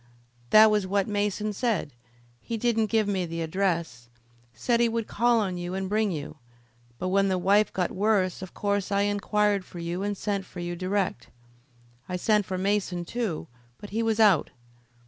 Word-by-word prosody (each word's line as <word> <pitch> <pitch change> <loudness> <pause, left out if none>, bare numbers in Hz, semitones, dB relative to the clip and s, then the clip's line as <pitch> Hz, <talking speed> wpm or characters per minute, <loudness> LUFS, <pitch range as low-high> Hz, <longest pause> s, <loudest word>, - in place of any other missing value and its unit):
"That 215 0 +8
was 210 -3 +1
what 200 0 +1
Mason 210 0 -1
said. 205 - -1 0.5
He 230 - -4
didn't 225 -1 +1
give 220 -1 +1
me 195 -3 0
the 165 0 -3
address. 165 -9 -2 0.4
Said 230 - 0
he 235 0 +3
would 230 -1 -2
call 235 +2 +2
on 185 -4 -2
you 175 +1 -4
and 190 0 -2
bring 215 +1 +1
you, 155 -3 -5 0.6
but 185 - -2
when 195 +1 +3
the 190 -1 +1
wife 200 +3 +3
got 180 -2 -1
worse 195 -3 +1
of 185 - -9
course 205 -1 -1
I 200 0 +2
inquired 205 0 +1
for 180 - -12
you 170 +2 -3
and 205 0 -2
sent 200 -1 -2
for 185 - -11
you 175 0 -4
direct. 185 - -2 0.8
I 180 - -2
sent 210 +2 +2
for 185 - -3
Mason, 190 -2 -1
too, 205 -6 -3 0.3
but 205 - -11
he 225 +2 -1
was 225 -1 0
out. 205 -8 +5
200 Hz, 185 wpm, -27 LUFS, 180-210 Hz, 0.8 s, That